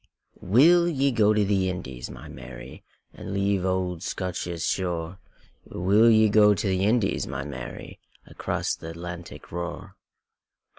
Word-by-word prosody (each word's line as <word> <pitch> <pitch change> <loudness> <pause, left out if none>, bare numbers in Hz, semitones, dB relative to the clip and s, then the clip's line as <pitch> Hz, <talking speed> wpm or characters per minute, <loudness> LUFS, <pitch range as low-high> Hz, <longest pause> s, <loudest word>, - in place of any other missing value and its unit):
WILL 165 - +5
ye 140 -3 +1
go 110 -3 +3
to 105 -1 +2
the 95 -2 +1
Indies, 65 -9 -6
my - - -10
Mary, 65 0 -10 0.3
And 95 - -7
leave 100 -1 +1
auld 95 -2 -1
Scotia's 90 -3 -4
shore? 90 -1 -2 0.4
Will 100 +6 +3
ye 110 -1 +5
go 105 0 +5
to 105 +2 -2
the 95 0 +1
Indies, 110 -2 +1
my 65 +1 -4
Mary, 65 -4 -8 0.3
Across - - -3
th' - - -20
Atlantic 85 +1 -8
roar? 85 0 -6
95 Hz, 140 wpm, -25 LUFS, 85-105 Hz, 0.4 s, WILL